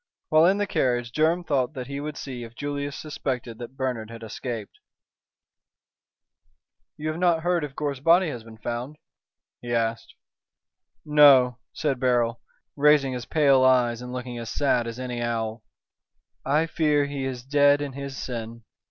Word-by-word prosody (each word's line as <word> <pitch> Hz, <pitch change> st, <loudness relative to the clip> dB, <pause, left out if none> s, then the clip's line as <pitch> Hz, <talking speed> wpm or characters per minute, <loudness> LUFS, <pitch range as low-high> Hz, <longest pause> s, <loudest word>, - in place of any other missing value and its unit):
While 155 Hz, +2 st, +6 dB
in 195 Hz, +2 st, +3 dB
the 205 Hz, -, 0 dB
carriage 120 Hz, -9 st, 0 dB
Durham 160 Hz, +5 st, +2 dB
thought 140 Hz, -2 st, 0 dB
he 140 Hz, +2 st, -5 dB
would 150 Hz, +1 st, -5 dB
see 125 Hz, -3 st, -6 dB
if 115 Hz, 0 st, -11 dB
Julius 145 Hz, 0 st, -4 dB
suspected 125 Hz, -6 st, -4 dB
that 125 Hz, +2 st, -9 dB
Bernard 125 Hz, -5 st, -2 dB
had 115 Hz, 0 st, -10 dB
escaped. 110 Hz, -1 st, -6 dB, 2.2 s
"You 155 Hz, +1 st, -3 dB
have 155 Hz, +2 st, -4 dB
not 170 Hz, -3 st, +2 dB
heard 175 Hz, -2 st, +1 dB
if 140 Hz, -2 st, -6 dB
Gore's 145 Hz, -3 st, -3 dB
body 170 Hz, +4 st, +4 dB
has 120 Hz, -6 st, -6 dB
been 110 Hz, -1 st, -13 dB
found?" 120 Hz, +6 st, -5 dB, 0.6 s
he 120 Hz, -, -6 dB
asked. 115 Hz, 0 st, -2 dB, 0.9 s
"No," 140 Hz, -5 st, +6 dB
said 140 Hz, -5 st, -1 dB
Beryl, 120 Hz, -2 st, +1 dB, 0.3 s
raising 145 Hz, -2 st, +4 dB
his 125 Hz, -2 st, -6 dB
pale 140 Hz, -4 st, +4 dB
eyes 125 Hz, -2 st, +3 dB
and 125 Hz, 0 st, -7 dB
looking 125 Hz, -1 st, -5 dB
as 115 Hz, -1 st, -6 dB
sad 125 Hz, -4 st, +1 dB
as 115 Hz, 0 st, -6 dB
any 125 Hz, -2 st, -4 dB
owl. 115 Hz, -1 st, -2 dB, 0.8 s
"I 150 Hz, +4 st, +2 dB
fear 150 Hz, -3 st, +1 dB
he 140 Hz, -1 st, -4 dB
is 125 Hz, -2 st, -4 dB
dead 145 Hz, +1 st, +4 dB
in 145 Hz, -2 st, -4 dB
his 140 Hz, 0 st, -6 dB
sin." 115 Hz, -2 st, -6 dB
130 Hz, 160 wpm, -25 LUFS, 120-150 Hz, 2.2 s, While